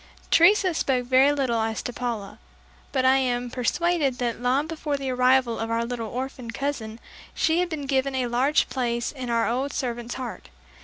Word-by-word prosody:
Teresa 370 Hz, +2 st, +5 dB
spoke 260 Hz, -5 st, 0 dB
very 260 Hz, +3 st, +5 dB
little 260 Hz, -6 st, 0 dB
as 220 Hz, 0 st, -2 dB
to 245 Hz, -, -4 dB
Paula, 230 Hz, -5 st, -4 dB, 0.5 s
but 260 Hz, -1 st, +1 dB
I 260 Hz, +1 st, +6 dB
am 245 Hz, -2 st, -1 dB
persuaded 275 Hz, +2 st, 0 dB
that 240 Hz, -1 st, -2 dB
long 260 Hz, +4 st, +2 dB
before 315 Hz, -2 st, -3 dB
the 270 Hz, -1 st, -3 dB
arrival 250 Hz, -1 st, +3 dB
of 225 Hz, -, -3 dB
our 230 Hz, 0 st, 0 dB
little 235 Hz, -2 st, -4 dB
orphan 255 Hz, -1 st, -5 dB
cousin, 230 Hz, -3 st, -4 dB, 0.4 s
she 325 Hz, +2 st, +2 dB
had 360 Hz, 0 st, 0 dB
been 305 Hz, -4 st, -4 dB
given 270 Hz, 0 st, 0 dB
a 255 Hz, -1 st, 0 dB
large 250 Hz, +5 st, +2 dB
place 240 Hz, -2 st, -2 dB
in 260 Hz, -4 st, -6 dB
our 230 Hz, -1 st, +1 dB
old 260 Hz, +4 st, -1 dB
servant's 240 Hz, -2 st, -3 dB
heart. 250 Hz, -3 st, -7 dB
255 Hz, 185 wpm, -25 LUFS, 240-275 Hz, 0.5 s, I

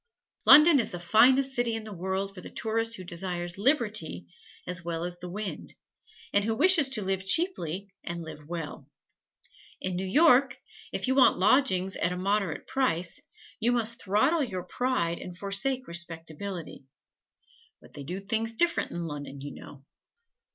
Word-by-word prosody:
London 300 Hz, -1 st, +9 dB
is 225 Hz, -, 0 dB
the 175 Hz, -, -7 dB
finest 260 Hz, +9 st, +4 dB
city 240 Hz, -3 st, 0 dB
in 225 Hz, -, -4 dB
the 215 Hz, -1 st, -7 dB
world 190 Hz, +2 st, -3 dB
for 185 Hz, -, -10 dB
the -, -, -9 dB
tourist 225 Hz, +1 st, -1 dB
who 185 Hz, -, -8 dB
desires 175 Hz, 0 st, -4 dB
liberty 210 Hz, -, +1 dB, 0.4 s
as 180 Hz, 0 st, -3 dB
wide 170 Hz, 0 st, -3 dB
as 175 Hz, 0 st, -6 dB
the 180 Hz, -, -7 dB
wind, 205 Hz, +2 st, -3 dB, 0.6 s
and 205 Hz, -, +3 dB
who 225 Hz, +1 st, -1 dB
wishes 325 Hz, -1 st, +5 dB
to 230 Hz, -6 st, 0 dB
live 190 Hz, 0 st, -1 dB
cheaply 200 Hz, -, -1 dB
and 170 Hz, 0 st, -5 dB
live 150 Hz, -2 st, -10 dB
well. 165 Hz, -3 st, -6 dB, 0.9 s
In 185 Hz, -1 st, -3 dB
New 190 Hz, +1 st, -3 dB
York, 275 Hz, -, +4 dB, 0.3 s
if -, -, -3 dB
you 260 Hz, -, +2 dB
want 265 Hz, -1 st, +5 dB
lodgings 190 Hz, -2 st, +2 dB
at 170 Hz, -, 0 dB
a 180 Hz, -, -3 dB
moderate 195 Hz, -3 st, -1 dB
price, 180 Hz, -11 st, -1 dB, 0.4 s
you 230 Hz, +2 st, +2 dB
must 230 Hz, -1 st, 0 dB
throttle 220 Hz, -, +2 dB
your 185 Hz, -8 st, -4 dB
pride 175 Hz, -11 st, -1 dB
and 180 Hz, -1 st, -9 dB
forsake 250 Hz, +7 st, -1 dB
respectability; 170 Hz, -1 st, -5 dB, 0.9 s
but -, -, -19 dB
they 145 Hz, -, -9 dB
do 180 Hz, +7 st, -5 dB
things 225 Hz, +3 st, -1 dB
different 340 Hz, +8 st, +1 dB
in 170 Hz, 0 st, -5 dB
Lunnon, 145 Hz, -3 st, -7 dB
you 145 Hz, +1 st, -7 dB
know. 140 Hz, -1 st, -13 dB
195 Hz, 165 wpm, -28 LUFS, 175-240 Hz, 0.9 s, London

